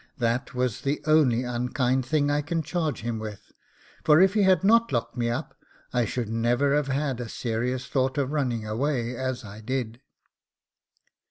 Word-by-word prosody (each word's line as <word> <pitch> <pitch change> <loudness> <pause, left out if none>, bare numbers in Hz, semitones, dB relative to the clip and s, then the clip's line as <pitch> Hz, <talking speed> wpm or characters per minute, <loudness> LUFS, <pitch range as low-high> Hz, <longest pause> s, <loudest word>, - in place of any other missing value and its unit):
That 120 0 -1
was 125 -3 -1
the 140 +2 -1
only 145 -6 +4
unkind 125 +1 0
thing 145 0 +2
I 145 0 +1
can 160 +2 -2
charge 155 - -2
him 115 0 -3
with; 110 -2 -8 0.5
for 150 0 +6
if 190 +1 +5
he 210 - +2
had 190 -3 +4
not 230 +3 +4
locked 120 0 -1
me 120 -2 0
up, 120 - -3 0.4
I 120 -1 +2
should 120 +1 -3
never 120 +5 +1
have 150 -2 +1
had 135 -2 -1
a 120 -2 -5
serious 125 +3 -2
thought 130 0 0
of 140 -1 0
running 125 -7 -1
away 120 +2 -1
as 130 -1 -3
I 105 +1 -10
did. 120 0 -3
130 Hz, 175 wpm, -26 LUFS, 120-145 Hz, 0.5 s, for